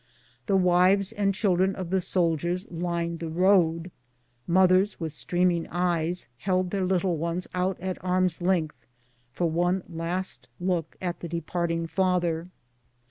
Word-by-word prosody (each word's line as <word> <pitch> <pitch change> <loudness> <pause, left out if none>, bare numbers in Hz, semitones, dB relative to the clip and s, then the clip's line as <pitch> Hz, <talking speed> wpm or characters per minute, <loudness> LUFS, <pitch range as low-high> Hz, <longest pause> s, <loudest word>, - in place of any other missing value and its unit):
The 195 - +2
wives 185 +2 +4
and 205 -3 +1
children 190 -1 +1
of 185 -2 -5
the 190 -1 +2
soldiers 175 +1 0
lined 170 -1 -2
the 165 0 -4
road. 175 -1 +2 0.6
Mothers, 185 +3 +4
with 160 -3 -4
streaming 175 +1 0
eyes, 175 0 -1
held 185 -2 0
their 195 -2 0
little 180 -2 +1
ones 170 +3 -2
out 185 +1 -1
at 185 0 -5
arm's 185 -2 +1
length 175 -4 -1 0.4
for 170 +6 0
one 175 +3 +1
last 175 +2 -3
look 175 -3 -1
at 175 -1 -2
the 170 - -6
departing 170 0 -2
father. 175 -2 0
180 Hz, 135 wpm, -26 LUFS, 170-185 Hz, 0.6 s, wives